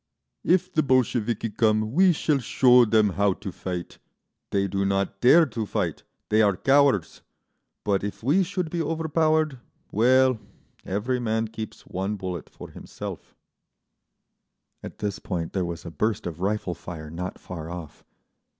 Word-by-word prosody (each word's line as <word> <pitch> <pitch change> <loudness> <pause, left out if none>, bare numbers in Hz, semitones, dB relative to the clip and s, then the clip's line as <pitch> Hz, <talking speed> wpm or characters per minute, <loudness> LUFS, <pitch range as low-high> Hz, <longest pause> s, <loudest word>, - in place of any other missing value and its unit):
"If 185 +1 +2
the 155 - +3
Bolsheviki 120 -5 +1
come 110 0 +1
we 185 +4 +5
shall 150 -3 +1
show 125 0 +5
them 110 -1 +3
how 100 +1 +2
to 100 +1 -7
fight. 90 -1 -6 0.5
They 100 0 +1
do 100 +1 -1
not 100 0 -1
dare 160 +7 +7
to 115 -5 -4
fight, - - -2 0.3
they 110 +1 +4
are 100 -4 +3
cowards. 135 - +3 0.6
But 100 -2 0
if 105 +2 -5
we 150 +10 +3
should 180 -3 -2
be 170 - -1
overpowered, 155 -2 +1 0.3
well, 130 +2 +4 0.4
every 120 +6 -1
man 110 -1 -1
keeps 110 -1 -8
one 95 +3 -3
bullet 90 -4 -5
for - - -11
himself…." - - -9 1.5
At - - -9
this 105 -2 -3
point 85 -3 -4
there 95 -2 0
was 85 0 -6
a 85 - -6
burst 110 +5 -1
of 85 -2 -5
rifle 100 -2 -1
fire 80 -3 -8
not 90 +3 -5
far 80 -3 -8
off. 85 -3 -8
110 Hz, 150 wpm, -25 LUFS, 95-130 Hz, 1.5 s, dare